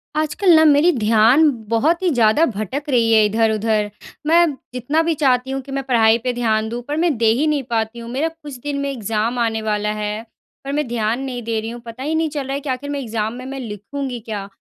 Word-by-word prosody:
आजकल 310 +5 +2
ना 315 - +6
मेरी 300 +3 +5
ध्यान 230 +8 +5 0.2
बहुत 305 +10 +2
ही 365 - +3
ज़्यादा 245 +2 +4
भटक 220 - -4
रही 235 -4 +3
है 220 -1 +6
इधर-उधर। 220 0 +1 0.4
मैं 340 +2 +6 0.3
जितना 270 +6 0
भी 330 0 +1
चाहती 265 -3 +1
हूँ 270 - -2
कि 270 +1 -12
मैं 270 0 -2
पढ़ाई 230 -4 +4
पे 250 -1 0
ध्यान 220 -2 0
दूँ, 240 +2 -4
पर 295 +1 -2
मैं 330 -3 +2
दे 230 - +1
ही 270 +7 +1
नहीं 295 -2 0
पाती 225 0 -1
हूँ। 230 - -8
मेरा 275 +6 0
कुछ 310 -4 -9
दिन 285 +2 -4
में 280 0 -2
एग्ज़ाम 225 0 -2
आने 225 -1 0
वाला 210 -1 -1
है, 210 0 -3 0.4
पर 275 - -4
मैं 300 -2 -1
ध्यान 230 0 -1
नहीं 255 -2 -4
दे 225 0 -1
रही 225 - -5
हूँ। 240 +1 -8
पता 230 +3 -8
ही 310 +3 -1
नहीं 320 0 +1
चल 290 -2 -4
रहा 270 - -3
है 280 - -2
कि 285 0 -7
आखिर 260 +2 -3
मैं 285 0 -2
एग्ज़ाम 220 -3 -3
में 250 +1 -8
मैं 270 +1 -6
लिखूँगी 245 +3 -5
क्या? 210 -3 -6
245 Hz, 240 wpm, -20 LUFS, 220-285 Hz, 0.4 s, ना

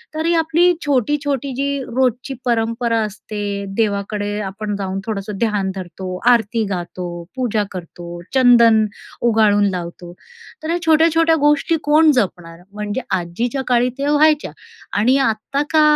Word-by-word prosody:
तरी 325 +2 +1
आपली 325 +2 +3
छोटी-छोटी 280 0 0
जी 280 +1 -1 0.2
रोजची 255 +1 0
परंपरा 230 0 0
असते, 205 -1 -5
देवाकडे 205 -1 -1
आपण 205 +1 -4
जाऊन 195 -1 -3
थोडंसं 205 -2 -4
ध्यान 210 -4 0
धरतो, 185 0 -6
आरती 230 -1 +2
गातो, 180 -1 -4 0.3
पूजा 230 -5 0
करतो, 175 -1 -8
चंदन 235 -4 +5 0.4
उगाळून 215 -3 +3
लावतो. 175 -1 -6 0.5
तर 315 - -4
ह्या 340 - +1
छोट्या-छोट्या 325 +1 +4
गोष्टी 295 +3 +2
कोण 305 +1 +5
जपणार. 175 - -2
म्हणजे 210 +3 -3 0.2
आजीच्या 230 +10 -3
काळी 245 0 +3
त्या 285 +1 0
व्हायच्या 300 0 +3 0.5
आणि 245 +6 +3
आत्ता 250 +3 0
का 315 -1 +4
230 Hz, 130 wpm, -19 LUFS, 200-280 Hz, 0.5 s, चंदन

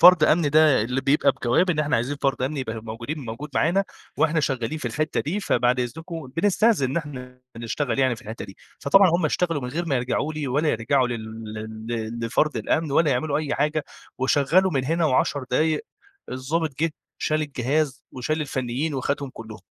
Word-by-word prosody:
فرد 180 -2 +9
أمني 155 0 +3
ده 150 -5 +5
اللي 125 +4 -1
بيبقى 140 0 +3
بجواب 135 +9 +2
إن 160 - -1
إحنا 150 -1 +2
عايزين 125 +5 -1
فرد 135 -2 0
أمني 140 +2 -1
يبقى 110 -3 -4
موجودين 115 +7 -5
موجود 130 +2 -6
معانا 190 +5 +2 0.3
وإحنا 160 0 +2
شغّالين 135 +1 -1
في 130 - -3
الحتّه 155 +6 -1
دي 180 +9 -2
فبعد 125 - +2
إذنكم، 160 +2 -5
بنستأذن 205 - +3
إن 140 - -3
إحنا 125 -5 -6
بنشتغل 120 +4 -2
يعني 130 -3 +2
في - - -14
الحتّه 110 +1 -7
دي. 95 -1 -12 0.2
فطبعًا 185 +6 +5
هم 170 +1 +1
اشتغلوا 165 -1 0
من 125 - -3
غير 165 +7 -2
ما 145 - 0
يرجعوا 125 +5 -1
لي، 150 -3 -3
ولا 150 +5 +1
يرجعوا 125 +1 +2
لل 110 -1 -6
لل 110 0 -7 0.3
ل - - -2
لفرد 150 +6 +1
الأمن 160 -2 0
ولا 150 +1 +3
يعملوا 145 +4 0
أي 150 -2 -2
حاجة، 150 +1 0 0.3
وشغّلوا 145 +8 +3
من 135 -3 0
هنا 165 +4 +1
و10 140 -1 +1
دقايق 155 +4 +1 0.5
الضابط 140 +3 -2
جِه 165 - +2 0.3
شال 155 0 0
الجهاز، 145 0 -1
وشال 155 +5 -2
الفنّيين 135 +1 -2
وخدهم 140 +1 -2
كُلّهم. 110 -2 -10
140 Hz, 190 wpm, -24 LUFS, 125-155 Hz, 0.5 s, فرد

